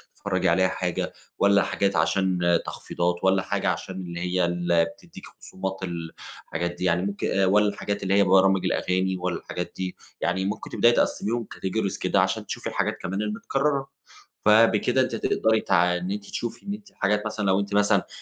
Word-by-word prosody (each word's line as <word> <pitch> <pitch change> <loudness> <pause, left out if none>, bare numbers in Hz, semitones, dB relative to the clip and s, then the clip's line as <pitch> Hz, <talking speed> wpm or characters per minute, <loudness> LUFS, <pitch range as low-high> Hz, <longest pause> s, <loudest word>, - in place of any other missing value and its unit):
تتفرجي - - 0
عليها 95 +2 +3
حاجة، 90 -1 -2 0.2
والَّا 100 0 +4
حاجات 100 -1 0
عشان 85 0 +2
تخفيضات؟ 90 0 -2
والَّا 95 0 +3
حاجة - - -1
عشان 95 - -3
اللي 85 -2 -6
هي 90 0 +1
اللي 85 -1 +2
بتديكِ 85 - -12
خصومات 95 0 -6
الحاجات 85 0 -5
دي - - -5
يعني 90 -1 +2
ممكن، 100 0 -2
والَّا 105 +2 +4
الحاجات 100 0 -4
اللي 95 0 0
هي 100 0 +5
برامج 95 0 +4
الأغاني، 95 +1 0
والَّا 90 -1 -2
الحاجات 90 - -6
دي 95 -1 -4 0.3
يعني، 95 +2 0
ممكن 105 +2 -4
تبدئي 120 - +4
تقسِّميهم 115 -1 0
categories 100 +1 -2
كده - - +2
عشان - - -1
تشوفي - - -5
الحاجات - - -1
كمان 95 +3 -3
المتكررة. 135 +6 -1 0.6
فبكده 115 +3 +5
أنتِ 130 -3 -1
هتقدري 110 0 +1
تع 90 -1 +2
إن 90 +2 -4
أنتِ 100 0 -4
تشوفي 120 - -5
إن 200 - -3
أنتِ 210 -1 -10
حاجات 105 +2 0
مثلًا 105 -1 -3
لو 95 0 +3
أنتِ 100 0 -3
مثلًا 105 0 +3
95 Hz, 175 wpm, -25 LUFS, 90-105 Hz, 0.6 s, هي